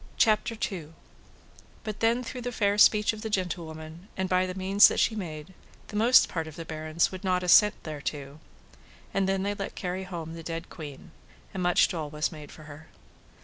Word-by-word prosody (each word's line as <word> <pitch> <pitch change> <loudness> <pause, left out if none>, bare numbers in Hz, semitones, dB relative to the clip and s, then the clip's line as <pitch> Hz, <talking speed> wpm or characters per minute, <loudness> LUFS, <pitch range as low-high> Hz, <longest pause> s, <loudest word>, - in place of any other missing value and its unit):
But 215 -2 -5
then 230 +2 +2
through 250 +1 -6
the 245 +1 -4
fair 205 -2 +1
speech 210 0 +5
of 215 - -8
the 220 - -4
gentlewoman, 170 -3 -4
and 190 0 -1
by 185 0 +2
the 185 - -5
means 195 +2 +6
that - - -1
she - - +3
made, 160 -4 -7 0.4
the 210 - -8
most 235 +4 +6
part 165 -2 -4
of 155 - -10
the 165 -1 -7
barons 155 +1 -1
would 185 +1 -8
not 180 -1 +1
assent 210 +3 +6
thereto. 145 -1 -6 0.7
And 195 -1 +1
then 195 0 0
they 200 +1 -1
let 200 -1 -6
carry 185 +1 -4
home 165 -3 -6
the 165 - -8
dead 165 +1 -6
queen, 150 -5 -10 0.4
and 190 - -4
much 180 0 +4
dole 155 -4 -4
was 150 +1 -2
made 150 -3 -10
for 155 - -13
her. 155 +1 -12
180 Hz, 190 wpm, -27 LUFS, 160-200 Hz, 0.7 s, means